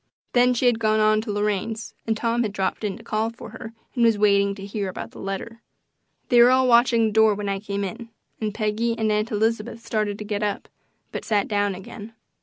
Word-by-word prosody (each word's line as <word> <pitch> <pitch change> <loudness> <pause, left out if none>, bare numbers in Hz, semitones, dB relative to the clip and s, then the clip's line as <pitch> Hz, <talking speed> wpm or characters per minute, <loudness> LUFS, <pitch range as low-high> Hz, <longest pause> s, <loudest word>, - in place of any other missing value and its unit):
Then 250 0 +4
she 245 - 0
had 240 -2 +3
gone 215 -1 +2
on 215 0 +3
to 220 -1 -5
Lorraine's 210 +2 -2
and 220 -1 +1
Tom 235 +1 0
had 220 -4 -1
dropped 190 +1 -2
in 200 -2 -2
to 230 - -14
call 220 +1 -1
for 230 -1 -11
her 225 0 -8 0.2
and 240 - +1
was 225 -2 +4
waiting 200 -1 +3
to 195 -1 -8
hear 200 -1 -3
about 185 - -7
the - - -12
letter. 210 +4 -5 0.7
They 240 -1 +6
were 240 - +8
all 260 0 +4
watching 235 -1 +5
the 220 - 0
door 220 0 +4
when 205 0 -4
I 195 0 -1
came 200 0 -3
in, 225 +5 -6 0.3
and 215 -1 -2
Peggy 220 +2 -1
and 220 -1 +1
Aunt 210 +1 0
Elizabeth 225 +2 -1
started 210 -2 -1
to 210 - -7
get 205 0 -2
up, 205 -1 -2 0.4
but - - -5
sat 210 -3 +1
down 205 -2 0
again. 205 +4 -10
215 Hz, 225 wpm, -24 LUFS, 205-230 Hz, 0.7 s, were